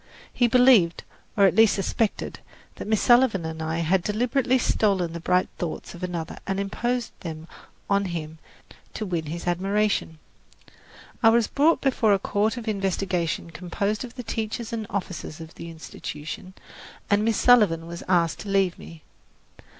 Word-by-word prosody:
He 245 Hz, -, +3 dB
believed, 235 Hz, -8 st, +5 dB, 0.3 s
or 200 Hz, -, +6 dB
at 195 Hz, -, +4 dB
least 220 Hz, -1 st, +5 dB
suspected, 205 Hz, +2 st, -2 dB, 0.4 s
that -, -, -6 dB
Miss 220 Hz, -1 st, +1 dB
Sullivan 240 Hz, -8 st, +4 dB
and 160 Hz, 0 st, -5 dB
I 160 Hz, +1 st, -2 dB
had 180 Hz, +3 st, +2 dB
deliberately 245 Hz, +6 st, +1 dB
stolen 195 Hz, -8 st, +1 dB
the 170 Hz, -, -5 dB
bright 180 Hz, +2 st, +2 dB
thoughts 170 Hz, -3 st, -5 dB
of 175 Hz, -, -11 dB
another 175 Hz, -3 st, -4 dB
and 195 Hz, 0 st, -1 dB
imposed 240 Hz, +5 st, -2 dB
them 160 Hz, -2 st, -7 dB, 0.4 s
on 200 Hz, 0 st, +2 dB
him 160 Hz, -3 st, -5 dB, 0.6 s
to 215 Hz, -, -3 dB
win 170 Hz, -5 st, -3 dB
his 170 Hz, +3 st, -5 dB
admiration. 195 Hz, -1 st, 0 dB, 1.0 s
I 225 Hz, -, +7 dB
was 230 Hz, 0 st, +4 dB
brought 305 Hz, +8 st, +2 dB
before 245 Hz, -6 st, +3 dB
a -, -, +4 dB
court 210 Hz, +4 st, 0 dB
of 235 Hz, -2 st, -7 dB
investigation 190 Hz, -5 st, -1 dB
composed 200 Hz, +6 st, -2 dB
of 245 Hz, -1 st, -9 dB
the 250 Hz, -, -6 dB
teachers 225 Hz, +1 st, -4 dB
and 220 Hz, -2 st, -3 dB
officers 185 Hz, -4 st, -5 dB
of 160 Hz, 0 st, -10 dB
the 170 Hz, -, -9 dB
Institution, 160 Hz, +2 st, -8 dB, 0.5 s
and 205 Hz, +1 st, +2 dB
Miss 225 Hz, -1 st, +1 dB
Sullivan 210 Hz, -10 st, +4 dB
was 170 Hz, 0 st, -7 dB
asked 170 Hz, -3 st, +2 dB
to 205 Hz, -, -7 dB
leave 195 Hz, -2 st, +1 dB
me. 165 Hz, -2 st, -12 dB
195 Hz, 160 wpm, -25 LUFS, 170-225 Hz, 1.0 s, I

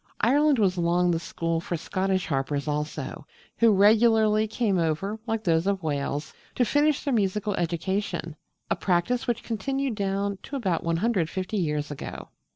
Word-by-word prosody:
Ireland 285 Hz, +4 st, +4 dB
was 190 Hz, -4 st, +2 dB
long 175 Hz, +1 st, +2 dB
the 165 Hz, -, 0 dB
school 165 Hz, 0 st, -2 dB
for 170 Hz, 0 st, -3 dB
Scottish 190 Hz, +2 st, -1 dB
harpers 140 Hz, 0 st, -2 dB
also, 150 Hz, -1 st, -4 dB, 0.3 s
who 230 Hz, 0 st, +6 dB
regularly 215 Hz, +1 st, +4 dB
came 210 Hz, -4 st, 0 dB
over, 170 Hz, +7 st, -1 dB
like 225 Hz, -1 st, -1 dB
those 165 Hz, -1 st, +2 dB
of 195 Hz, -2 st, 0 dB
Wales, 145 Hz, -1 st, -2 dB, 0.2 s
to 245 Hz, -, +2 dB
finish 290 Hz, +4 st, +2 dB
their 280 Hz, -, 0 dB
musical 210 Hz, -1 st, 0 dB
education 175 Hz, -1 st, -2 dB, 0.4 s
a -, -, +4 dB
practice 195 Hz, +7 st, 0 dB
which 235 Hz, -1 st, -1 dB
continued 270 Hz, +4 st, -2 dB
down 200 Hz, -1 st, -2 dB
to 280 Hz, -, -7 dB
about 190 Hz, -11 st, -1 dB
150 185 Hz, +1 st, -1 dB
years 150 Hz, -6 st, -1 dB
ago. 145 Hz, -, -7 dB
190 Hz, 155 wpm, -26 LUFS, 165-220 Hz, 0.4 s, who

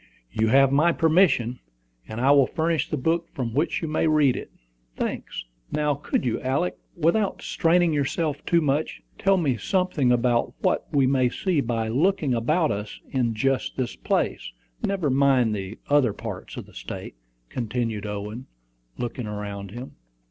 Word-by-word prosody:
"You 110 Hz, -, +1 dB
have 135 Hz, +3 st, +5 dB
my 155 Hz, +5 st, +4 dB
permission; 160 Hz, -8 st, +3 dB, 0.5 s
and 110 Hz, -, -6 dB
I 135 Hz, +3 st, +4 dB
will 140 Hz, -2 st, +6 dB
furnish 160 Hz, -2 st, 0 dB
the 150 Hz, -, -1 dB
book 165 Hz, +5 st, 0 dB
from 120 Hz, -6 st, -3 dB
which 150 Hz, +5 st, 0 dB
you -, -, -1 dB
may 155 Hz, +1 st, +1 dB
read 150 Hz, -4 st, +4 dB
it." -, -, -6 dB, 0.5 s
"Thanks. -, -, -4 dB, 0.3 s
Now, 150 Hz, -1 st, +1 dB
could 140 Hz, -1 st, -2 dB
you, 120 Hz, -, -1 dB
Alick, 135 Hz, +8 st, 0 dB, 0.2 s
without 180 Hz, +5 st, +1 dB
straining 170 Hz, 0 st, +2 dB
yourself 145 Hz, +1 st, -1 dB
too 170 Hz, -1 st, +3 dB
much, 150 Hz, +1 st, -1 dB, 0.2 s
tell 195 Hz, 0 st, +3 dB
me 140 Hz, -9 st, +1 dB
something 180 Hz, -, +1 dB
about 120 Hz, -1 st, +2 dB
what -, -, +1 dB
we 140 Hz, -2 st, +3 dB
may 130 Hz, -1 st, +3 dB
see 175 Hz, +2 st, 0 dB
by 115 Hz, -2 st, -1 dB
looking 145 Hz, -, +1 dB
about 155 Hz, +8 st, +1 dB
us 105 Hz, +1 st, -5 dB
in 120 Hz, -4 st, 0 dB
just 135 Hz, +3 st, 0 dB
this 130 Hz, -2 st, -2 dB
place -, -, -1 dB, 0.3 s
never 185 Hz, -8 st, 0 dB
mind 130 Hz, -4 st, +3 dB
the 100 Hz, +1 st, -5 dB
other 145 Hz, -7 st, +3 dB
parts -, -, -7 dB
of -, -, -6 dB
the -, -, -18 dB
State," -, -, -7 dB, 0.4 s
continued 115 Hz, -3 st, -2 dB
Owen, 105 Hz, +4 st, -5 dB, 0.5 s
looking 120 Hz, -1 st, -4 dB
around 100 Hz, -1 st, -5 dB
him. 120 Hz, +6 st, -9 dB
135 Hz, 165 wpm, -25 LUFS, 120-160 Hz, 0.5 s, will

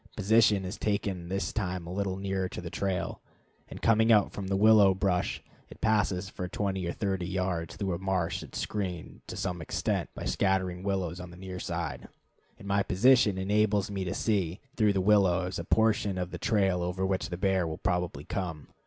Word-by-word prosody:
Position 105 Hz, -1 st, +4 dB
is 90 Hz, +4 st, -6 dB
taken 100 Hz, -4 st, -2 dB
this 95 Hz, +1 st, -2 dB
time 90 Hz, -4 st, -2 dB
a 85 Hz, -, -6 dB
little 95 Hz, -1 st, -2 dB
nearer 95 Hz, -1 st, -2 dB
the 85 Hz, -1 st, -6 dB
trail. 95 Hz, -2 st, -2 dB, 0.5 s
In -, -, -9 dB
coming 115 Hz, 0 st, +3 dB
out 105 Hz, -3 st, +5 dB
from 100 Hz, -2 st, -5 dB
the 95 Hz, -, 0 dB
willow 105 Hz, -2 st, +6 dB
brush 95 Hz, -2 st, 0 dB, 0.3 s
it -, -, -13 dB
passes 105 Hz, -4 st, +1 dB
for 90 Hz, -1 st, -5 dB
twenty 95 Hz, -1 st, -2 dB
or -, -, -1 dB
thirty 95 Hz, -2 st, -2 dB
yards 90 Hz, -4 st, -2 dB
through 95 Hz, -3 st, -2 dB
a 85 Hz, -, -3 dB
marsh 95 Hz, -3 st, -1 dB
that -, -, -11 dB
is -, -, -2 dB
screened, 95 Hz, -5 st, -4 dB
to -, -, -6 dB
some 90 Hz, -2 st, -3 dB
extent, -, -, -1 dB
by -, -, -6 dB
scattering 95 Hz, -2 st, 0 dB
willows 95 Hz, -3 st, -2 dB
on 90 Hz, -1 st, -8 dB
the 90 Hz, -, -12 dB
near 95 Hz, 0 st, -7 dB
side; -, -, -4 dB, 0.5 s
and 100 Hz, -, -11 dB
my 100 Hz, 0 st, +2 dB
position 105 Hz, 0 st, +4 dB
enables 105 Hz, +1 st, +1 dB
me 95 Hz, -1 st, -2 dB
to 90 Hz, -, -3 dB
see, 95 Hz, -5 st, 0 dB, 0.2 s
through 105 Hz, -3 st, +3 dB
these 95 Hz, -1 st, 0 dB
willows, 95 Hz, -3 st, +3 dB
a -, -, -3 dB
portion 105 Hz, -1 st, +2 dB
of 90 Hz, 0 st, -3 dB
the -, -, -6 dB
trail 95 Hz, -5 st, +2 dB
over 90 Hz, +2 st, -1 dB
which 95 Hz, -2 st, -1 dB
the 90 Hz, -, -4 dB
bear 95 Hz, -2 st, +1 dB
will 80 Hz, -, -4 dB
probably 90 Hz, -2 st, -1 dB
come. 90 Hz, -6 st, -4 dB
95 Hz, 195 wpm, -29 LUFS, 90-100 Hz, 0.5 s, willow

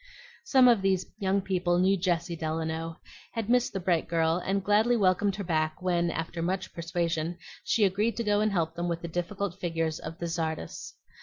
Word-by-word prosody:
Some 265 Hz, -, +5 dB
of 235 Hz, -5 st, +5 dB
these 190 Hz, -1 st, +1 dB
young 195 Hz, -1 st, +1 dB
people 180 Hz, -2 st, 0 dB
knew 190 Hz, +2 st, +4 dB
Jessie 175 Hz, -2 st, -1 dB
Delano, 160 Hz, 0 st, -3 dB, 0.3 s
had 225 Hz, -1 st, -2 dB
missed 245 Hz, -1 st, +3 dB
the 195 Hz, -, -3 dB
bright 175 Hz, -2 st, +1 dB
girl, 165 Hz, +1 st, +1 dB
and 195 Hz, 0 st, 0 dB
gladly 215 Hz, +4 st, +3 dB
welcomed 195 Hz, 0 st, +2 dB
her 205 Hz, -, -4 dB
back 155 Hz, -2 st, 0 dB
when, 175 Hz, -2 st, +1 dB
after 165 Hz, +1 st, -4 dB
much 185 Hz, +2 st, -2 dB
persuasion, 170 Hz, 0 st, -2 dB, 0.3 s
she 225 Hz, -, +2 dB
agreed 205 Hz, +4 st, 0 dB
to 235 Hz, -, 0 dB
go 205 Hz, -1 st, +2 dB
and 215 Hz, 0 st, +2 dB
help 165 Hz, -4 st, 0 dB
them 175 Hz, +1 st, -3 dB
with 170 Hz, 0 st, -3 dB
the -, -, -3 dB
difficult 175 Hz, +2 st, -3 dB
figures 165 Hz, -2 st, -1 dB
of 160 Hz, +1 st, -7 dB
the 170 Hz, -, -4 dB
tzardas. 160 Hz, -, -4 dB
175 Hz, 190 wpm, -28 LUFS, 165-195 Hz, 0.3 s, Some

